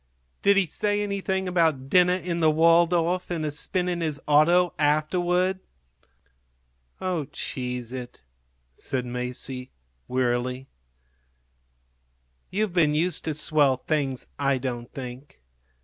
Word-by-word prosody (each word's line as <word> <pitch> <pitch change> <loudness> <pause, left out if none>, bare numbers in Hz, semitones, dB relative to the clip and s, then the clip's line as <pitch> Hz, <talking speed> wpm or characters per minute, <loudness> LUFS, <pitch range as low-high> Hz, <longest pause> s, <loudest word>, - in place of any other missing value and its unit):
"Did 200 0 +4
he 195 - +4
say 205 +5 -1
anything 190 -2 -2
about 160 -7 +1
dinner 180 +3 +4
in 175 -2 -3
the 160 -1 +4
Waldorf 170 +2 +3
and 165 -3 -2
a 150 - -1
spin 180 +5 -1
in 175 -1 -1
his 155 -3 -2
auto 170 +4 +4
afterward?" 175 +5 +1 1.4
"Oh, 180 -5 -2
cheese 125 -3 -5
it!" 125 -2 -7 0.5
said 125 - -4
Masie, 125 +1 -5 0.4
wearily. 125 +1 -1 1.8
"You've 205 -1 -1
been 155 -4 +3
used 170 +2 0
to 155 - -2
swell 145 -3 +3
things, 135 -2 -2
I 140 -1 +2
don't 120 -2 -5
think. 130 - -9
155 Hz, 115 wpm, -25 LUFS, 130-180 Hz, 1.8 s, Did